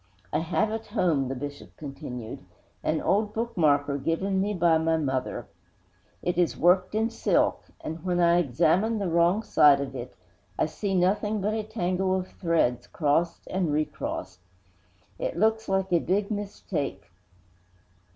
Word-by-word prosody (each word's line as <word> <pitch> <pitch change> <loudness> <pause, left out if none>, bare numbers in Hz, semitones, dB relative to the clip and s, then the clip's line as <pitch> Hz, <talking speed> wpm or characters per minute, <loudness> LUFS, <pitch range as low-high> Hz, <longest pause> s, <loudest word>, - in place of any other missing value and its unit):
I - - +2
have 180 +6 0
at 225 0 -4
home,' 170 - +1
the 135 - -3
Bishop 145 +2 -8
continued, 135 -6 -7 0.4
'an - - 0
old 210 +1 +1
bookmarker 150 -11 +1
given 190 +5 0
me 205 +2 0
by 170 -2 +4
my 160 0 +2
mother. 130 -5 -2 0.8
It 175 0 0
is 175 - +1
worked 185 +3 +3
in 225 +1 +1
silk, - - +1 0.2
and, 160 +1 -6
when 180 -1 0
I 170 0 +5
examine 175 - +2
the 200 -2 -1
wrong 170 +6 +3
side 145 -8 +5
of 135 -1 -4
it, 125 -4 -7 0.4
I - - +2
see 190 +6 -3
nothing 205 +4 +1
but 205 +2 0
a 220 - -1
tangle 185 -3 -1
of 185 -1 -2
threads 165 -9 0
crossed 160 +2 0
and 180 -4 0
recrossed. 150 -10 -3 0.8
It - - -3
looks 220 +3 +1
like 190 -1 0
a 170 - +5
big 200 +5 0
mistake. 175 - -4
175 Hz, 150 wpm, -27 LUFS, 150-195 Hz, 0.8 s, I